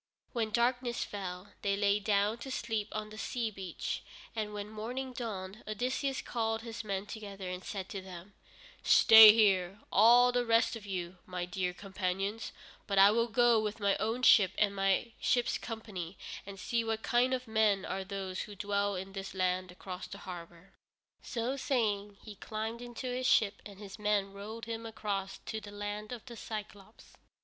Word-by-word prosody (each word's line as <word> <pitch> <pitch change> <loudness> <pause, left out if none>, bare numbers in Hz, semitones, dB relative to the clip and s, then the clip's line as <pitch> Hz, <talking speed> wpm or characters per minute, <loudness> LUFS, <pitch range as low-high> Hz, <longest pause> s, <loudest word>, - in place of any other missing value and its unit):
When 230 -3 0
darkness 240 +2 +1
fell, 190 -1 -6
they 200 0 +1
lay 205 0 +3
down 210 +2 +1
to 270 - -7
sleep 225 -4 -2
on 215 0 -4
the 215 - -9
sea 230 -2 -2
beach, 190 -4 -4 0.3
and 215 -2 -2
when 205 0 -5
morning 245 +5 -5
dawned 210 -4 -5
Odysseus 255 +5 -1
called 225 -1 -1
his 230 -1 -6
men 200 -1 -3
together 200 -3 -7
and 180 0 -6
said 195 -3 -5
to 195 - -5
them: 185 +1 -10 0.5
"Stay 220 -1 +10
here, 195 -3 +3
all 240 +4 +7
the 245 0 +1
rest 230 0 +3
of 210 -3 -9
you, 180 -1 -4
my 180 -1 -3
dear 180 0 -2
companions, 195 +3 -3 0.4
but 200 - -1
I 195 +1 +8
will 230 +2 +2
go 240 -1 +4
with 215 0 -3
my 200 -1 +2
own 225 +3 -2
ship 195 -7 +7
and 205 -1 +2
my 195 +4 +1
ship's 245 -1 +1
company 200 -6 -6 0.3
and 195 -1 -8
see 230 +3 0
what 225 -1 -2
kind 245 +2 +3
of 255 -1 -2
men 215 -3 +2
are 190 0 -3
those 190 -1 -4
who 210 - -8
dwell 200 0 0
in 190 +1 -6
this 195 0 -6
land 185 -1 0
across 185 0 -7
the 200 - -8
harbor." 175 0 -10 0.5
So 240 +3 -2
saying, 210 -7 -1
he 215 - -9
climbed 220 +3 -4
into 245 +1 -7
his 255 0 -1
ship, 215 -6 +3
and 200 -2 -12
his 200 0 -10
men 205 -2 +1
rowed 215 +3 -7
him 230 0 -5
across 205 -3 -3
to 220 - -4
the 210 - -9
Land 205 +1 -5
of 240 -3 -7
the 245 - -9
Cyclôpes. 215 -1 -8
210 Hz, 180 wpm, -32 LUFS, 195-230 Hz, 0.5 s, Stay